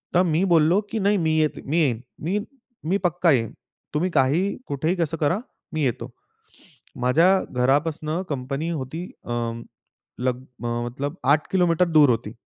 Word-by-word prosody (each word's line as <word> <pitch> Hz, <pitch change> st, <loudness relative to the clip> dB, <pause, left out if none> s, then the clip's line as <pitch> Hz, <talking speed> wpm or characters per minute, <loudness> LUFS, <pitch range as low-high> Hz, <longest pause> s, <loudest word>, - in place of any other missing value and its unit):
तर 180 Hz, -, +5 dB
मी 160 Hz, +4 st, +2 dB
बोललो 165 Hz, +4 st, +5 dB
की 225 Hz, -, -1 dB
नाही 205 Hz, +1 st, +2 dB
मी 160 Hz, -3 st, +1 dB
येत 155 Hz, -1 st, 0 dB
मी 150 Hz, +5 st, 0 dB
येईन. 120 Hz, -7 st, +1 dB, 0.2 s
मी 185 Hz, +7 st, -1 dB, 0.4 s
मी 180 Hz, +5 st, +1 dB
पक्का 175 Hz, 0 st, +3 dB
येईन. 115 Hz, -5 st, +1 dB, 0.4 s
तुम्ही 165 Hz, +5 st, +1 dB
काहीही, 155 Hz, +7 st, +2 dB
कुठेही, 155 Hz, +5 st, 0 dB
कसं 165 Hz, -3 st, -1 dB
करा 155 Hz, +4 st, +1 dB, 0.4 s
मी 155 Hz, -, -1 dB
येतो. 125 Hz, -2 st, -1 dB, 0.9 s
माझ्या 125 Hz, +8 st, +4 dB, 0.2 s
घरापासून 145 Hz, +5 st, +1 dB, 0.2 s
कंपनी 140 Hz, +3 st, -3 dB
होती 155 Hz, +2 st, -4 dB, 0.2 s
अ, -, -, -6 dB, 0.9 s
लग 125 Hz, 0 st, 0 dB
अ, 125 Hz, -2 st, -9 dB, 0.2 s
मतलब 140 Hz, +6 st, -4 dB, 0.2 s
8 155 Hz, -, 0 dB
किलोमीटर 180 Hz, -2 st, +3 dB
दूर 145 Hz, -3 st, +7 dB
होती. 115 Hz, -3 st, 0 dB
155 Hz, 155 wpm, -24 LUFS, 130-170 Hz, 0.9 s, दूर